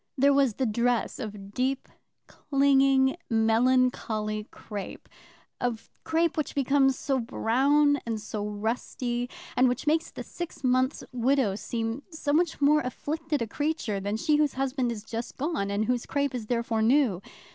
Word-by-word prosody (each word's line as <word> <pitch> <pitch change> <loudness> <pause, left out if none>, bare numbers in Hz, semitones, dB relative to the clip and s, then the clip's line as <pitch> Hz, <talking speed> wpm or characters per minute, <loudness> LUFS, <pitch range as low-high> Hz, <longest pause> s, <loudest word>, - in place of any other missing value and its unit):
There 280 +2 +5
was 275 -6 +3
the 265 - 0
dress 235 +1 0
of 205 -4 -7
deep, 260 +3 -1 0.4
clinging, 275 -1 +3
melancholy 225 -2 +1
crape, 205 -3 -8 0.5
of 240 -2 -3
crape 325 0 +1
which 305 - -2
becomes 270 -1 +3
so 270 -2 0
brown 280 +5 +2
and 225 -2 -3
so 210 0 -5
rusty, 240 +3 -3 0.3
and 255 0 +4
which 250 +3 -3
makes 315 +2 +1
the - - -7
six 345 -4 -7
months' 255 +2 +1
widow 250 -3 +2
seem 225 +4 -3
so 310 -3 -2
much 335 +1 +1
more 295 +1 +4
afflicted 300 +2 -3
a - - -5
creature 290 -5 -2
than 205 +2 -2
she 300 +6 +2
whose 300 -2 +1
husband 260 -2 -1
is 215 -3 -6
just 230 +1 -6
gone, 285 - -1
and 200 +2 0
whose 245 +1 -1
crape 280 -1 0
is 235 -4 -5
therefore 235 -1 0
new. 230 -5 +3
255 Hz, 155 wpm, -27 LUFS, 225-280 Hz, 0.5 s, There